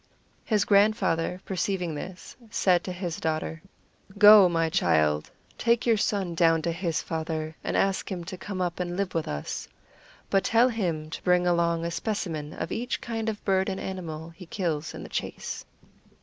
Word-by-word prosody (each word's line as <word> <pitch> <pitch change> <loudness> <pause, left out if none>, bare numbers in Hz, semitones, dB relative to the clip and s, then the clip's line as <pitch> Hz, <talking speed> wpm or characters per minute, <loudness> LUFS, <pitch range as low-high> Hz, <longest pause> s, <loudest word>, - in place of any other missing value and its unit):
His 210 -3 +1
grandfather, 190 -4 +2
perceiving 185 -2 -1
this, 175 +5 -8
said 180 -5 +2
to 185 - -3
his 175 -2 -4
daughter: 160 +1 -2 0.6
"Go, 205 -2 +9
my 165 -1 +1
child, 75 - +2 0.3
take 235 0 +2
your 230 -2 +4
son 200 -4 0
down 165 -1 +3
to 170 - 0
his 165 -1 -2
father, 160 -1 -3
and - - -1
ask 195 +1 0
him 180 -2 -3
to 185 +2 -6
come 185 0 -5
up 175 -1 -2
and 175 0 -3
live 195 -2 -1
with 165 -2 -1
us. 75 0 -4 0.6
But 195 -1 +3
tell 235 +2 +4
him 170 -9 -2
to - - -6
bring 180 0 +3
along 170 -1 +2
a 170 - -2
specimen 165 -5 -3
of - - -5
each 245 +2 -2
kind 225 -1 -3
of 210 -1 -6
bird 190 0 +2
and 190 - -3
animal 165 -4 -5
he 170 +1 -13
kills 165 -5 -2
in - - -7
the - - -7
chase." - - -4
180 Hz, 175 wpm, -27 LUFS, 165-200 Hz, 0.6 s, Go